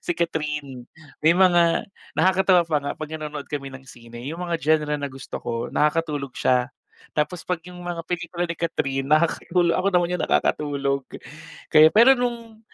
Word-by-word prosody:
si 175 - 0
Kathryn. 150 -6 -3 0.4
May 160 - +7
mga 175 -2 +3 0.3
nakakatawa 185 -1 +4
pa 155 - +1
nga 140 - -4
pag 155 -1 -7
nanonood 150 -2 -6
kami 140 -2 -5
ng 130 - -10
sine 120 -1 -12
yung 165 - -6
mga 170 - -2
genre 150 0 +2
na 140 - -3
gusto 135 +1 -8
ko, 115 0 -3
nakakatulog 150 -2 0
siya. 125 0 +2 0.5
Tapos 160 +3 -1
pag 180 -2 0
yung 180 0 -10
mga 175 -1 -5
pelikula 175 0 -3
ni 170 - -4
Kathryn, 135 -5 -2
nakakatulog 170 +2 +2
ako 190 +2 +1
naman 175 0 -1
yung 180 - -2
nakakatulog. 140 -2 0 0.7
Kaya, 155 0 +8
pero 230 +9 +7
nung 235 -3 -4
160 Hz, 165 wpm, -23 LUFS, 145-175 Hz, 0.7 s, Kaya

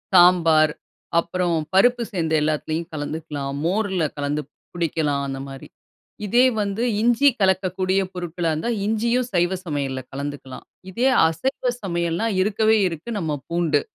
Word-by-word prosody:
சாம்பார், 165 -4 +6 0.5
அப்புறம் 175 0 -1 0.2
பருப்பு 240 +5 +4
சேர்ந்த 165 -4 -1
எல்லாத்துலயும் 155 +2 -2
கலந்துக்கலாம், 145 -2 -4
மோர்ல 190 -3 0
கலந்து 145 +1 -2 0.3
குடிக்கலாம், 155 -4 0
அந்தமாரி. 135 0 -7 0.6
இதே 245 +5 +5 0.2
வந்து 200 +3 -2 0.2
இஞ்சி 240 +5 +4
கலக்கக்கூடிய 190 0 +1
பொருட்களா 175 -1 -3
இருந்தா, 160 +10 -2 0.2
இஞ்சியும் 235 +3 0
சைவ 175 +2 +2
சமையல்ல 140 -4 -2
கலந்துக்கலாம். 140 -1 -6 0.3
இதே 245 +7 +2 0.2
அசைவ 250 - -1
சமையல்ன்னா, 170 +2 -1 0.2
இருக்கவே 220 +2 +2
இருக்கு 165 +7 -7
நம்ம 155 -4 -2
பூண்டு 165 -4 +1
170 Hz, 115 wpm, -22 LUFS, 150-200 Hz, 0.6 s, சாம்பார்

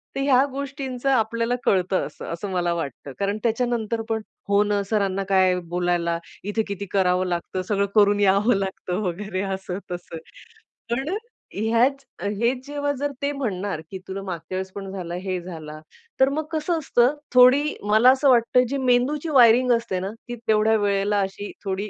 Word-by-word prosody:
तर 275 - -1
ह्या 270 -1 +4
गोष्टींचं 275 -1 -4
आपल्याला 230 -1 +1
कळतं 185 0 +1
असं, - - -9
असं 195 +4 -5
मला 175 -2 0
वाटतं. 140 -4 -5
कारण 200 +1 0
त्याच्यानंतर 230 -1 0
पण 220 -1 0 0.3
हो 200 +1 +4
ना, 205 -1 0
सरांना 195 -3 0
काय 190 -1 +4
आहे 180 - 0
बोलायला, 175 -1 0 0.3
इथे 210 +3 -1
किती 200 0 -4
करावं 185 -1 +2
लागतं, 175 +1 -3
सगळं 200 +1 0
करून 205 -1 +5
यावं 205 +3 +4
लागतं 190 0 -3
वगैरे, 185 +2 -3
असं 190 -1 -5
तसं. 175 -2 -6 0.7
पण 265 +6 -1 0.5
ह्याच 235 +6 +2 0.2
हेच 235 +6 -1
जेव्हा 285 0 -1
जर 290 0 -1
ते 285 +1 0
म्हणणार 205 - -3
की 190 - -6
"तुला 195 +1 -5
मागच्या 175 -1 -6
वेळेस 190 0 -4
पण 195 -1 -6
झाला, 175 -3 -5
हे 185 0 -3
झाला," 155 -3 -8 0.4
तर 265 +1 +5
मग 305 +2 -2
कसं 320 +2 0
असतं 260 -1 +2 0.2
थोडी 255 +3 +7 0.2
मला 215 +5 +6
असं 270 +1 +3
वाटतं 250 +1 +4
जी 280 - -1
मेंदूची 265 +5 +1
वायरिंग 250 -2 +6
असते 230 -5 -1
ना 190 +2 -4 0.2
ती 240 - -3
तेवढ्या 220 +1 +4
वेळेला 205 0 +1
अशी 195 +1 -4
थोडी 195 +2 -2
205 Hz, 170 wpm, -23 LUFS, 190-250 Hz, 0.7 s, थोडी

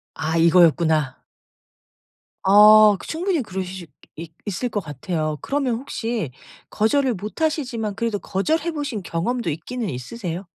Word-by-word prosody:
아 160 +1 -2
이거였구나. 165 -4 +3 1.2
어 210 +1 +7
그 - - -11
충분히 340 -1 -1
그러실 185 -4 -6
수 140 - -40 0.2
있 165 0 -8
있을 210 +5 -3
것 210 - -2
같아요. 155 0 -3
그러면 270 -4 -1
혹시 225 - -4 0.4
거절을 245 +3 +1
못하시지만 230 - -3
그래도 230 -3 -1
거절해 315 - -1
보신 280 - -4
경험도 180 +6 -2
있기는 210 +9 -4
있으세요? 175 - -6
205 Hz, 300 characters per minute, -22 LUFS, 165-245 Hz, 1.2 s, 어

